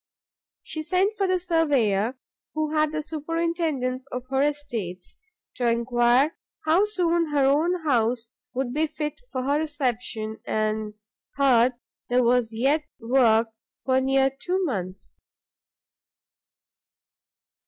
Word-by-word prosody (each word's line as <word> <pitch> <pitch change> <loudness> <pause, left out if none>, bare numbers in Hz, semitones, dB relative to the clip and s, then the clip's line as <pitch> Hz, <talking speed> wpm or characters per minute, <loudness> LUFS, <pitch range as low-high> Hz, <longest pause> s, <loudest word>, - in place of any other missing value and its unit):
She 315 - -5
sent 375 +6 +1
for 395 -3 0
the 370 0 +2
surveyor 270 - +1 0.4
who 310 0 -1
had 305 -1 +2
the 310 0 -3
superintendance 310 -4 -2
of 250 0 -4
her 270 0 +1
estates, 240 -12 -3 0.4
to 245 - +1
enquire 240 +5 +3 0.3
how 335 +6 +4
soon 345 -5 +1
her 285 -2 +2
own 320 +6 +2
house 240 -4 +1 0.3
would 255 -1 -2
be 310 +2 +1
fit 300 - -5
for 255 - -2
her 285 +3 +1
reception; 245 -7 -3
and 215 0 -1 0.4
heard 255 -3 +4 0.4
there 250 +1 +3
was 240 -1 +2
yet 270 +7 +1 0.2
work 230 -2 +3 0.4
for 260 0 +3
near 270 0 +3
two 365 +7 -2
months. 190 - -5
270 Hz, 120 wpm, -25 LUFS, 240-315 Hz, 0.4 s, how